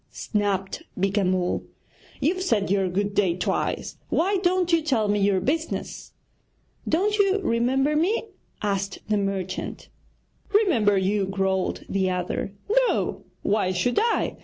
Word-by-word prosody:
snapped 200 Hz, -2 st, -2 dB, 0.2 s
Beeka 195 Hz, +2 st, +1 dB
Mull; 180 Hz, -1 st, 0 dB, 0.6 s
'you've 365 Hz, +5 st, +1 dB
said 215 Hz, -, +1 dB
your 195 Hz, -2 st, +2 dB
"good 200 Hz, +3 st, -1 dB
day" 190 Hz, -4 st, +2 dB
twice, 180 Hz, -, -2 dB
why 390 Hz, +4 st, +2 dB
don't 360 Hz, -1 st, +1 dB
you 330 Hz, -, +5 dB
tell 255 Hz, -9 st, +1 dB
me 205 Hz, 0 st, +1 dB
your 195 Hz, -1 st, +3 dB
business?' 320 Hz, -, -3 dB, 0.8 s
'Don't 410 Hz, +6 st, +1 dB
you 395 Hz, 0 st, +4 dB
remember 265 Hz, +5 st, +2 dB
me?' 360 Hz, +9 st, +2 dB, 0.4 s
asked 200 Hz, -1 st, -1 dB
the 210 Hz, -, +2 dB
merchant. 195 Hz, -2 st, -3 dB, 0.6 s
'Remember 255 Hz, -, +4 dB
you?' 195 Hz, +1 st, +1 dB
growled 190 Hz, -1 st, -1 dB
the 190 Hz, -1 st, 0 dB
other; 180 Hz, +1 st, -2 dB, 0.4 s
'no, -, -, -1 dB, 0.2 s
why 205 Hz, -3 st, +1 dB
should 190 Hz, +7 st, +1 dB
I? 460 Hz, 0 st, 0 dB
205 Hz, 135 wpm, -25 LUFS, 195-320 Hz, 0.8 s, you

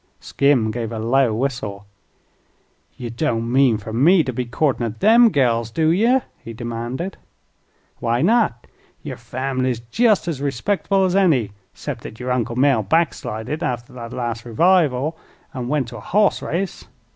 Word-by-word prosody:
Skim 135 Hz, -6 st, +1 dB
gave 115 Hz, 0 st, -4 dB
a 115 Hz, -, -4 dB
low 120 Hz, +3 st, +2 dB
whistle. 110 Hz, -4 st, -3 dB, 1.1 s
"Ye 120 Hz, -2 st, -6 dB
don't 115 Hz, -2 st, -1 dB
mean 130 Hz, -3 st, +4 dB
fer 110 Hz, +1 st, -8 dB
me 160 Hz, +9 st, +5 dB
to 130 Hz, -2 st, -4 dB
be 125 Hz, +1 st, -2 dB
courtin' 125 Hz, +1 st, 0 dB
at 110 Hz, -1 st, -4 dB
them 230 Hz, +2 st, +6 dB
gals, 120 Hz, -, +1 dB
do 155 Hz, +7 st, +1 dB
ye?" 235 Hz, +9 st, +3 dB, 0.2 s
he 115 Hz, -, -9 dB
demanded. 120 Hz, -, -5 dB, 0.8 s
"Why 120 Hz, +3 st, 0 dB
not? 200 Hz, -, +2 dB, 0.4 s
Yer -, -, -5 dB
fambly's 130 Hz, +1 st, -2 dB
jest 220 Hz, -6 st, +3 dB
as 150 Hz, -5 st, -3 dB
respectible 190 Hz, +8 st, 0 dB
as 185 Hz, 0 st, 0 dB
any, 150 Hz, -, +3 dB, 0.2 s
'cept -, -, -6 dB
thet 110 Hz, -, -10 dB
yer 125 Hz, 0 st, -3 dB
Uncle 120 Hz, -2 st, -1 dB
Mell 130 Hz, -2 st, +3 dB
backslided 120 Hz, -, -1 dB
after 120 Hz, -6 st, -3 dB
the 120 Hz, -2 st, -8 dB
last 120 Hz, -2 st, -3 dB
revival, 155 Hz, +2 st, +2 dB, 0.3 s
an' 125 Hz, -3 st, -4 dB
went 135 Hz, -3 st, -1 dB
to 120 Hz, -, -9 dB
a -, -, -8 dB
hoss 205 Hz, -, +1 dB
race. 180 Hz, +4 st, -3 dB
125 Hz, 155 wpm, -21 LUFS, 115-160 Hz, 1.1 s, them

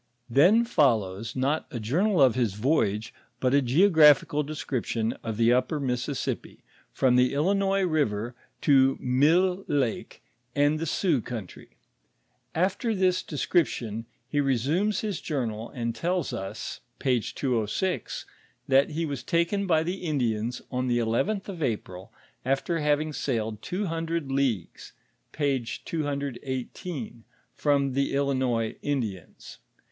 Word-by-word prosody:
Then 185 Hz, -, +5 dB
follows, 115 Hz, -, +1 dB
not 135 Hz, +4 st, 0 dB
a 120 Hz, -, -5 dB
journal 170 Hz, -, +1 dB
of 130 Hz, -3 st, +5 dB
his 115 Hz, -5 st, 0 dB
voyoge, 110 Hz, -3 st, +1 dB, 0.3 s
but 130 Hz, 0 st, +1 dB
a 140 Hz, -, +5 dB
geographical 150 Hz, +1 st, +5 dB
description 130 Hz, -6 st, -2 dB
of 110 Hz, -2 st, -4 dB
the 115 Hz, +1 st, +4 dB
upper 140 Hz, +5 st, +1 dB
Mississippi, 125 Hz, -3 st, -3 dB, 0.3 s
from 125 Hz, -, +3 dB
the 125 Hz, +2 st, +3 dB
Illinois 195 Hz, +5 st, +2 dB
river 125 Hz, -, 0 dB, 0.3 s
to 135 Hz, -2 st, +4 dB
Mille 170 Hz, +9 st, +3 dB
lake 135 Hz, -6 st, -2 dB, 0.3 s
and 145 Hz, +2 st, +3 dB
the 165 Hz, -, -2 dB
Sioux 155 Hz, -, +1 dB
country. 110 Hz, -5 st, -8 dB, 0.8 s
After 195 Hz, +6 st, 0 dB
this 185 Hz, -1 st, +2 dB
descrip 165 Hz, +3 st, +1 dB
tion, 115 Hz, 0 st, -5 dB, 0.2 s
he 145 Hz, -, +1 dB
resumes 145 Hz, -, +1 dB
his 205 Hz, -6 st, -3 dB
journal 115 Hz, -7 st, -3 dB
and 115 Hz, -2 st, -3 dB
tells 175 Hz, -3 st, -1 dB
us 105 Hz, -1 st, -5 dB, 0.2 s
(p. 125 Hz, -3 st, +2 dB
206), 125 Hz, -, -2 dB, 0.4 s
that 135 Hz, +1 st, +4 dB
he 165 Hz, +2 st, -2 dB
was 140 Hz, -5 st, -4 dB
taken 170 Hz, +7 st, 0 dB
by 160 Hz, -3 st, +3 dB
the 180 Hz, +3 st, -3 dB
Indians 120 Hz, -, -1 dB
on 130 Hz, 0 st, -1 dB
the 120 Hz, -1 st, +2 dB
eleventh 120 Hz, -, 0 dB
of 185 Hz, -5 st, -7 dB
April, 105 Hz, -5 st, -3 dB, 0.3 s
after 135 Hz, +6 st, 0 dB
having 150 Hz, +1 st, +1 dB
sailed 110 Hz, -6 st, -2 dB
two 195 Hz, +3 st, -3 dB
hundred 165 Hz, -4 st, -2 dB
leagues 130 Hz, -10 st, -2 dB, 0.4 s
(p. 140 Hz, -4 st, 0 dB, 0.2 s
21 140 Hz, -4 st, -3 dB
P), 150 Hz, -11 st, -6 dB, 0.4 s
from 140 Hz, -2 st, +1 dB
the 140 Hz, +1 st, 0 dB
Illinois 130 Hz, -5 st, 0 dB
(Indians). 110 Hz, -, -4 dB
140 Hz, 130 wpm, -27 LUFS, 120-165 Hz, 0.8 s, Then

